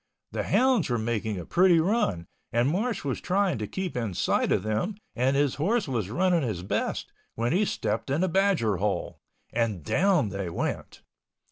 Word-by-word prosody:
The - - -2
hounds 255 - +3
were 120 - +1
making 110 -2 -2
a 85 - -6
pretty 180 -2 +4
run 165 - +1 0.3
and 120 +2 +2
Marsh 200 - -1
was 135 -3 -2
trying 190 - +1
to 105 - -3
keep 190 - -4
in 115 -7 -2
sight - - +1
of - - +2
them 110 - -1 0.2
and 130 +3 +2
his 140 -1 +2
horse 215 +4 +1
was 115 -8 -2
running 175 - +2
his 105 - -3
best, 95 - -2 0.2
when 115 +5 0
he 205 +4 +3
stepped 110 - -2
in 145 +6 +1
a - - +2
badger 180 - +2
hole... 100 +2 -2 0.3
and 110 -8 -1
down 175 - +2
they 100 -2 -4
went. 85 - -4
135 Hz, 180 wpm, -27 LUFS, -, 0.3 s, pretty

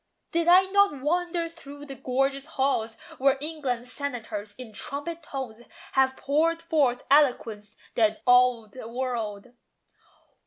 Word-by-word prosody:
Did 335 0 0
I 360 +2 +8
not 390 -6 +3
wander 340 +3 0
through 290 -3 -11
the 275 - -7
gorgeous 270 +2 -1
halls 230 -5 0 0.2
Where 275 +1 +4
England's 270 -5 -3
senators, 220 -8 -5
in 245 -4 -10
trumpet 290 +9 -5
tones, 260 -7 -6 0.3
Have 265 0 +2
poured 325 +4 +1
forth 290 -7 +1
eloquence 230 -8 +2 0.2
that 215 -1 +1
awed 245 -3 +4
the 255 -3 -9
world? 235 -3 -4
265 Hz, 125 wpm, -27 LUFS, 240-305 Hz, 0.3 s, I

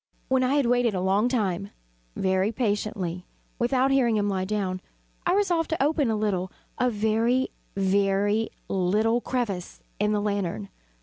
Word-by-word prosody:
When 260 0 +3
I 260 +3 +2
had 285 -3 +3
waited 240 -3 +2
a - - 0
long 195 +5 +2
time, 200 -5 -1 0.5
very 190 +2 +1
patiently, 205 -6 -2 0.3
without 255 +2 +2
hearing 250 -4 +3
him 205 -1 +1
lie 190 -2 -1
down, 190 -2 -2 0.5
I 350 - +3
resolved 355 -5 +1
to 320 -4 0
open 295 -3 +2
a 220 - +1
little 195 -3 -1 0.3
a 250 - +3
very, 225 +4 +1 0.3
very 200 +2 +2 0.2
little 210 +6 +1
crevice 210 -10 -3 0.2
in 210 +1 +2
the 210 - +1
lantern. 195 - -2
210 Hz, 150 wpm, -26 LUFS, 195-245 Hz, 0.5 s, When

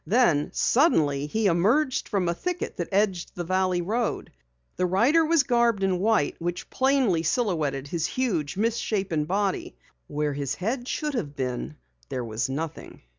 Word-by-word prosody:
Then 190 - +3
suddenly 150 - +2
he 220 +8 -1
emerged 225 - +2
from 195 -4 0
a 170 - +1
thicket 360 - -4
that 175 - -2
edged 195 -3 0
the 175 - -3
valley 185 0 +1
road. 225 +5 -2 0.5
The 180 - +1
rider 240 - +4
was 320 -2 +3
garbed 235 -5 +2
in 185 -2 +1
white 210 -6 +2
which 175 +1 -4
plainly 260 -10 +2
silhouetted 155 - 0
his 165 0 -1
huge, 190 - -1
misshapen 195 -7 0
body. 195 +3 -1 0.3
Where 150 0 -1
his 140 -1 -3
head 245 +6 -3
should 300 +1 -2
have 150 - -3
been 125 - -3 0.3
there 125 -2 -3
was 110 +2 -2
nothing. 155 +4 -6
185 Hz, 155 wpm, -26 LUFS, 155-235 Hz, 0.5 s, rider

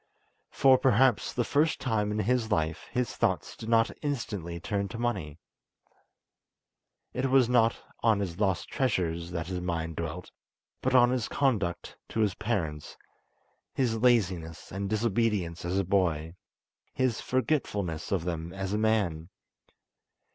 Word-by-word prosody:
For 130 -1 +5
perhaps 130 -2 +3
the 120 - 0
first 150 +6 +1
time 105 -5 0
in 105 - -2
his 120 +1 +1
life 80 -3 -1
his 125 0 -1
thoughts - - 0
did 110 - -7
not 115 -1 +4
instantly 105 - -3
turn 100 +3 -2
to 115 - -7
money. 100 -11 -2 1.8
It 130 +2 0
was 130 -2 +5
not 115 -2 +3 0.2
on 110 -3 +3
his 90 -3 -4
lost 95 -4 +1
treasures 85 -10 -1
that 85 -2 -3
his 90 +1 -4
mind 80 -2 -3
dwelt, 85 +1 -5 0.5
but 130 0 +1
on 120 -1 +6
his 125 -4 0
conduct 105 -11 -1
to 110 - -1
his 105 -3 +2
parents: 85 -10 -3 0.8
his 115 -4 +1
laziness 95 -9 +1
and 100 +1 -3
disobedience 105 -6 0
as 90 +2 -1
a 95 - +2
boy; 85 -4 +1 0.6
his 130 -3 0
forgetfulness 110 - -1
of 95 -4 +1
them 85 -1 -4
as 95 0 -3
a 105 - +1
man. 100 -7 +1
105 Hz, 140 wpm, -29 LUFS, 85-120 Hz, 1.8 s, on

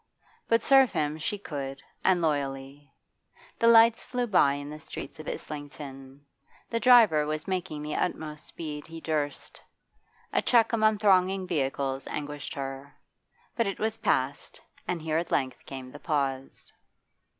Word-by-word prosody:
But 230 0 +3
serve 270 -2 +6
him 155 -2 -1
she 205 +7 -2
could 140 -7 -6 0.2
and 180 -2 +3
loyally. 140 -1 -2 0.7
The 230 - +4
lights 230 0 +6
flew 250 -1 -2
by 180 -10 +4
in 145 0 -5
the 150 - -8
streets 140 -1 -8
of 155 - -9
Islington; 145 -2 -8 0.5
the 230 - 0
driver 225 -12 +6
was 155 +2 -3
making 175 -5 -3
the 150 0 -4
utmost 150 0 -3
speed 150 -3 -6
he 165 0 -8
durst. 155 -3 -3 0.7
A - - +3
check 235 -2 +3
among 215 -1 +3
thronging 190 -2 +3
vehicles 135 -5 -2
anguished 145 -1 -5
her. 135 +1 -6 0.6
But 230 -3 +1
it 195 - -3
was 220 +1 -2
past, 135 -7 -1 0.3
and 170 -3 -2
here 160 0 +1
at 170 - -4
length 130 -2 -1
came 130 -2 -7
the - - -11
pause. 135 -4 -3
155 Hz, 150 wpm, -28 LUFS, 140-195 Hz, 0.7 s, serve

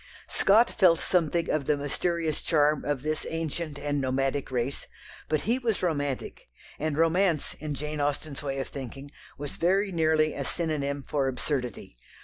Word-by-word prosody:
Scott 220 +5 +5
felt 170 -3 +5
something 170 -1 +1
of 155 -3 0
the 150 - +2
mysterious 160 +2 -1
charm 150 -2 +3
of 145 -3 -1
this 155 0 -1
ancient 160 -1 -3
and 145 0 -1
nomadic 135 +1 0
race, 130 +1 -2 0.4
but 155 -1 +1
he 235 +5 +1
was 225 -6 -1
romantic, 145 -6 -2 0.3
and 155 -1 -1
romance, 165 -1 +2
in 150 -1 -3
Jane 150 +1 -3
Austen's 145 -1 -2
way 135 -1 -3
of 135 - -3
thinking, 135 +1 -7 0.3
was 145 0 -6
very 195 +4 +2
nearly 155 -2 +3
a 140 - -3
synonym 145 -3 -2
for 140 -3 +1
absurdity. 125 - -3
150 Hz, 155 wpm, -28 LUFS, 140-165 Hz, 0.4 s, Scott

